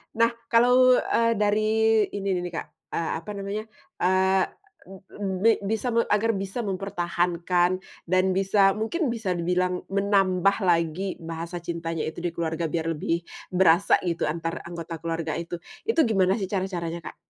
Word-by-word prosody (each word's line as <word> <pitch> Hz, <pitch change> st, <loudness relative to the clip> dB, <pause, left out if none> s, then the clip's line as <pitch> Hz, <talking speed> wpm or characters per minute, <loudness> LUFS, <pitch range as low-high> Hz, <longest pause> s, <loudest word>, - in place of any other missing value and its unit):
Nah, 230 Hz, +1 st, +4 dB, 0.2 s
kalau, 250 Hz, +2 st, +5 dB
eee, 230 Hz, -1 st, +2 dB
dari 210 Hz, 0 st, +2 dB, 0.5 s
ini 195 Hz, -1 st, -1 dB
nih 180 Hz, -, 0 dB
nih, 175 Hz, -, -10 dB
Kak, -, -, -4 dB, 0.3 s
eee, 165 Hz, -1 st, -1 dB
apa 170 Hz, +6 st, -8 dB
namanya, 200 Hz, +2 st, -4 dB, 0.4 s
eee, 190 Hz, +1 st, +3 dB, 0.4 s
b 190 Hz, 0 st, -6 dB
bi 230 Hz, -, +7 dB
bisa 220 Hz, +4 st, -1 dB, 0.2 s
agar 225 Hz, +2 st, +2 dB
bisa 195 Hz, +5 st, -3 dB
mempertahankan 180 Hz, -2 st, 0 dB, 0.2 s
dan 185 Hz, +2 st, +2 dB
bisa 195 Hz, 0 st, +4 dB
mungkin 270 Hz, +7 st, -1 dB
bisa 220 Hz, -6 st, -2 dB
dibilang 180 Hz, +1 st, 0 dB
menambah 195 Hz, -1 st, +2 dB
lagi 175 Hz, +1 st, 0 dB
bahasa 165 Hz, +1 st, -6 dB
cintanya 165 Hz, -1 st, -3 dB
itu 160 Hz, +2 st, -5 dB
di 175 Hz, -, -1 dB
keluarga 165 Hz, -1 st, -2 dB
biar 165 Hz, 0 st, -2 dB
lebih 170 Hz, +3 st, -2 dB, 0.2 s
berasa 180 Hz, 0 st, +4 dB
gitu 170 Hz, -1 st, -1 dB
antar 165 Hz, +1 st, -3 dB
anggota 170 Hz, -1 st, -7 dB
keluarga 165 Hz, -1 st, -2 dB
itu, 170 Hz, +1 st, -4 dB, 0.3 s
itu 450 Hz, -, +2 dB
gimana 195 Hz, -2 st, +2 dB
sih 195 Hz, -, -1 dB
cara-caranya 180 Hz, -3 st, -3 dB
Kak? -, -, -8 dB
185 Hz, 150 wpm, -25 LUFS, 170-200 Hz, 0.5 s, bi